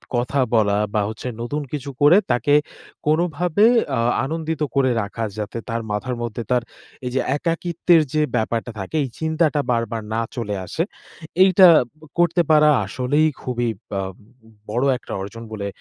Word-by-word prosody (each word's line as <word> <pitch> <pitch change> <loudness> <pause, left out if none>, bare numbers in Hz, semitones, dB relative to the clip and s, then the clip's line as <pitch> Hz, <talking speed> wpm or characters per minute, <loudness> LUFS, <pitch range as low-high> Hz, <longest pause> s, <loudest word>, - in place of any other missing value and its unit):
কথা 125 +3 0 0.2
বলা, 105 -2 +3 0.2
বা 105 - +2
হচ্ছে 110 +3 -7
নতুন 145 +6 -3
কিছু 145 -2 -4
করে 150 +6 +7
তাকে 120 +4 +2 0.5
কোনোভাবে 175 +5 +2 0.3
আ - - 0 0.3
আনন্দিত 160 +1 -3
করে 135 -2 +3
রাখা। 110 +2 -5
যাতে 105 +2 -4
তার 115 0 -2
মাথার 125 +5 -2
মধ্যে 120 0 -4
তার 125 -1 +2 0.4
এই 125 - -2
যে 130 - +2 0.2
একাকিত্বের 170 +1 +2
যে 155 - +2
ব্যাপারটা 115 +1 -1
থাকে, 95 +9 -6
এই 135 - -4
চিন্তাটা 160 -2 +1
বারবার 115 -1 -1
না 115 - 0
চলে 110 -5 -3
আসে। 160 - -2 0.6
এইটা 190 0 +7 0.3
ব - - -32 0.2
করতে 175 0 +3
পারা 150 0 +6 0.2
আসলেই 130 +9 +1
খুবই 120 -2 -1 0.3
আম 95 0 -4 0.6
বড় 120 +5 0
একটা - - -13
অর্জন 100 +4 -7
বলে 100 -2 -4
130 Hz, 155 wpm, -21 LUFS, 115-155 Hz, 0.6 s, করে